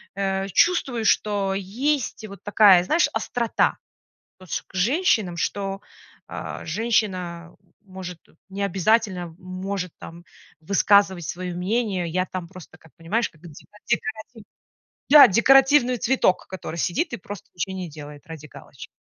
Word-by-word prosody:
э, 195 0 -1
чувствую, 260 - +2
что 200 -3 +1
есть 225 +4 -2
вот 200 -1 -12
такая, 205 -3 +6
знаешь, 320 - +2
острота 235 -2 0 0.6
вот 185 - -15
ск - - -3
к - - -24
женщинам, 215 - +1
что, 195 +2 -3 0.5
а, - - -7
женщина 180 -4 -2 0.3
может 185 -3 -9 0.3
не 200 +1 -5
обязательно 195 -3 0
может 185 0 -5
там 170 +1 -11 0.4
высказывать 195 +1 +3
свое 180 0 -5
мнение. 190 -1 -1
Я 185 +2 -1
там 185 -2 -6
просто, 180 -3 -13
как 160 -1 -21
понимаешь, 205 +9 -1
как 155 - -25
деко 170 -4 -12 0.3
декоративный 225 -2 -4 0.6
да, 295 0 +10
декоративный 265 +3 +4
цветок, 230 -6 +1
который 185 -3 -7
сидит 175 - -1
и - - -3
просто 200 0 -10
ничего 190 +2 -3
не 185 -2 -5
делает 145 -1 -11
ради 160 -2 -9
галочки. - - -12
195 Hz, 135 wpm, -23 LUFS, 175-220 Hz, 0.6 s, да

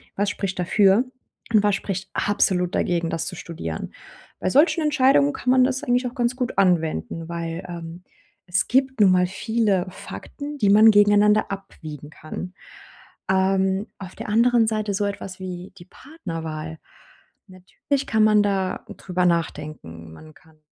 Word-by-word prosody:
was 205 +1 0
spricht 195 -2 -4
dafür 195 +4 +3 0.5
und 215 - +6
was 205 -1 +2
spricht 190 -1 -5
absolut 185 -3 +1
dagegen, 170 -2 0
das 165 -1 -2
zu 180 - -5
studieren?“ 80 - -6 0.5
Bei 185 - -1
solchen 315 - +4
Entscheidungen 260 - +3
kann 250 - -1
man 255 0 +5
das 260 0 0
eigentlich 250 +1 +1
auch 245 - -8
ganz 240 -1 0
gut 250 -5 -3
anwenden, 165 - 0
weil, 165 -1 -4
ähm, 170 0 -8 0.4
es 180 +1 0
gibt 265 0 +1
nun 200 -3 +6
mal 180 0 +3
viele 200 -1 0
Fakten, 290 +9 -8
die 205 -7 +2
man 215 +2 +7
gegeneinander 205 0 +4
abwiegen 155 -7 -8
kann. 155 +4 -8 0.8
Ähm, 190 +1 +1
auf 185 -2 -9
der - - -7
anderen 230 +1 +3
Seite 215 -2 -1
so 205 +1 0
etwas 195 -2 -6
wie 185 -1 -7
die 175 - -13
Partnerwahl, 165 - -7 0.7
natürlich 190 +9 -4
kann 220 -1 +2
man 210 -1 +4
da 195 -2 -1
drüber 180 -1 -1
nachdenken. 150 - -3
Man 155 - -14
kann 160 0 -23
190 Hz, 155 wpm, -23 LUFS, 170-215 Hz, 0.8 s, man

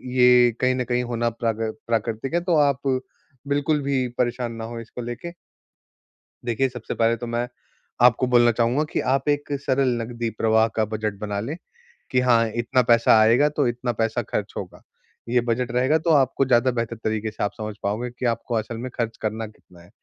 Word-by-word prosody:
ये 125 -1 +6
कहीं 130 0 +3
न 125 - -1
कहीं 125 0 0
होना 120 -1 -1
प्राकृ 115 -1 -2 0.2
प्राकृतिक 115 +3 -2
है, 170 - +2
तो 175 -1 +1
आप 140 -2 +2 0.7
बिल्कुल 145 +1 +1
भी 135 -2 0
परेशान 120 -1 -1
ना 115 0 -7
हों, 115 +1 -6
इसको 115 +2 -9
लेके। 120 +9 -6 1.1
देखिए 120 +3 +1
सबसे 125 -3 -6
पहले 115 0 +2
तो 120 - -6
मैं, 120 +1 -2 0.5
आपको 125 +1 +5
बोलना 120 -1 +5
चाहूँगा 120 +6 +1
कि - - 0
आप 135 +1 0
एक 145 0 0
सरल 135 0 +2
नकदी 115 0 -4
प्रवाह 110 0 +3
का 110 - +3
बजट 110 -1 -3
बना 105 -1 -3
लें 140 +9 -4 0.6
कि, 125 - +3
हाँ 120 -2 +3
इतना 120 +2 +2
पैसा 115 -1 +5
आएगा 120 +7 +5
तो 145 -2 0
इतना 120 +1 -2
पैसा 115 +2 0
खर्च 105 -1 -4
होगा। 90 -2 -7 0.5
ये 120 +1 +3
बजट 120 +1 0
रहेगा 130 +6 +2
तो 165 - -2
आपको 135 -2 +3
ज़्यादा 125 0 +3
बेहतर 115 -1 -3
तरीके 110 0 -2
से 110 - -4
आप 100 - 0
समझ 110 -1 -5
पाओगे 110 +5 -2
कि 125 +1 -6
आपको 120 0 -1
असल 110 +1 -3
में 125 +3 -5
खर्च 115 -2 -2
करना 110 +1 -3
कितना 90 -4 -19
है। 85 - -18
120 Hz, 195 wpm, -23 LUFS, 115-130 Hz, 1.1 s, ये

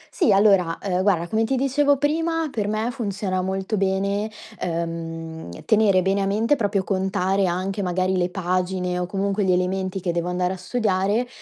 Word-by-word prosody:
Sì 290 - +3
allora, 195 -4 +4
ehm, 185 -2 -1
guarda 185 -4 +2
come 220 +5 +1
ti 265 +4 0
dicevo 275 +2 +2
prima, 325 +3 0
per 210 -4 -2
me 215 +3 -1
funziona 200 -6 -2
molto 190 +3 -2
bene, 200 +2 0 0.3
ehm, 165 - -4 0.2
tenere 205 -4 +4
bene 195 +1 +1
a 195 - 0
mente, 220 +7 +2
proprio 205 -5 0
contare 190 0 0
anche 190 +3 -2
magari, 185 +1 0
le 180 -1 +1
pagine 180 0 -1
o 180 - -2
comunque 200 +2 -1
gli 190 - +2
elementi 185 +1 0
che 175 - -1
devo 170 0 -2
andare 180 +1 0
a - - -7
studiare, 205 +2 0
190 Hz, 175 wpm, -23 LUFS, 180-210 Hz, 0.3 s, allora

